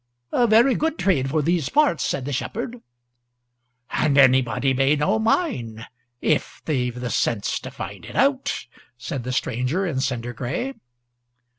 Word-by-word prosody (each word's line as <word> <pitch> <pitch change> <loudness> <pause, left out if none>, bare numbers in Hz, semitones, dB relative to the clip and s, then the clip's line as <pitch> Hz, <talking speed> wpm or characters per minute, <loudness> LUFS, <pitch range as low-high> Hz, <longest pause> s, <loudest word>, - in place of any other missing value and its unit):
"A 240 - +3
very 230 +4 +5
good 320 +4 -1
trade 135 -9 +1
for 155 +1 +1
these 165 -3 +1
parts," 295 - +3
said 130 - -2
the 145 - -3
shepherd. 235 - -4 1.1
"And 145 -2 +1
anybody 130 -1 +4
may 135 +3 +3
know 190 +9 +1
mine 120 - -1 0.4
if 155 - 0
they've 125 -5 -1
the 125 -1 -3
sense 110 -4 0
to - - -8
find 95 -1 -8
it - - -10
out," 275 0 +1 0.3
said 130 +1 -5
the 125 - -2
stranger 125 +8 -1
in 155 -7 -1
cinder 120 -2 -2
gray. 155 - -3
140 Hz, 150 wpm, -23 LUFS, -, 1.1 s, very